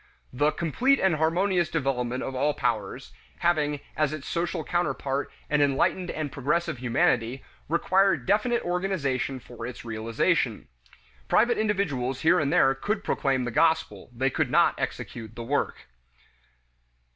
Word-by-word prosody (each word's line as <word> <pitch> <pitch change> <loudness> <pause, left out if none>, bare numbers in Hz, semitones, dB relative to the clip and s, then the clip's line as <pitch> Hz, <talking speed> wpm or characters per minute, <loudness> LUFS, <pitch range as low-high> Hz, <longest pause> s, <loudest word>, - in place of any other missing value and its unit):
The 145 +4 +2
"complete 245 - +1
and 190 -5 +2
harmonious 175 +2 +1
development 130 -5 -1
of 135 - -4
all 145 +3 +1
powers," 115 +1 -2 0.3
having 150 -4 +1
as 155 -2 +1
its 155 -2 -7
social 170 -1 -2
counterpart 145 -5 -1 0.2
an 150 0 +2
enlightened 170 +6 +1
and 155 -3 -3
progressive 150 +2 -1
humanity, 120 0 +1 0.3
required 190 +4 +2
definite 220 +5 +1
organization 170 -8 -1
for 120 -1 -11
its 125 -1 -9
realization. 115 0 0 0.6
Private 240 -1 +3
individuals 145 -12 -1
here 175 +3 +4
and 145 -2 0
there 135 - +4
could 205 +10 -2
proclaim 135 -2 0
the 120 - -3
gospel; 160 +3 +1
they 130 +3 0
could - - 0
not - - +4
execute 115 -2 -5
the 120 - -6
work. 140 +5 -2
145 Hz, 135 wpm, -26 LUFS, 130-175 Hz, 0.6 s, here